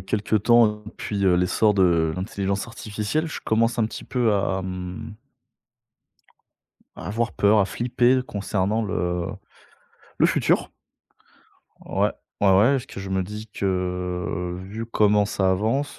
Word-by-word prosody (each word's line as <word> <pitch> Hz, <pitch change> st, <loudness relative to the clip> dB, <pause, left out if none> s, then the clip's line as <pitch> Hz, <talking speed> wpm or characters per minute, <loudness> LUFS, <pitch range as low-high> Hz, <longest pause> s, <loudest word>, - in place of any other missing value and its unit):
quelques 100 Hz, +2 st, -1 dB
temps, 120 Hz, -1 st, +6 dB
hein, 105 Hz, 0 st, -4 dB
depuis, 105 Hz, -2 st, -4 dB
heu, 95 Hz, -2 st, +5 dB
l'essor 90 Hz, +4 st, +2 dB
de 85 Hz, -4 st, +3 dB
l'intelligence 100 Hz, +1 st, -2 dB
artificielle, 110 Hz, +7 st, -3 dB
je 155 Hz, -, -6 dB
commence 115 Hz, +2 st, +1 dB
un -, -, +3 dB
petit -, -, -8 dB
peu 120 Hz, -4 st, +1 dB
à, 95 Hz, -1 st, 0 dB
hem, 90 Hz, +3 st, -6 dB, 1.8 s
à -, -, -7 dB
avoir 115 Hz, +4 st, -1 dB
peur, 105 Hz, +1 st, +3 dB
à 100 Hz, -, +4 dB
flipper 120 Hz, +3 st, +2 dB
concernant 100 Hz, +1 st, -1 dB
le, 100 Hz, -, -4 dB
heu, 90 Hz, -1 st, -1 dB, 0.9 s
le -, -, +6 dB
futur. -, -, +1 dB, 1.1 s
Ouais, -, -, 0 dB, 0.3 s
ouais, 100 Hz, -, +4 dB
ouais, 100 Hz, +7 st, +5 dB
parce 130 Hz, -, -2 dB
que -, -, -8 dB
je 95 Hz, 0 st, -7 dB
me 95 Hz, 0 st, +1 dB
dis 105 Hz, +3 st, -8 dB
que, 90 Hz, -2 st, -2 dB
vu 110 Hz, +4 st, -6 dB
comment 105 Hz, -2 st, +3 dB
ça 95 Hz, -2 st, +1 dB
avance, 115 Hz, +10 st, -1 dB
100 Hz, 145 wpm, -24 LUFS, 95-110 Hz, 1.8 s, temps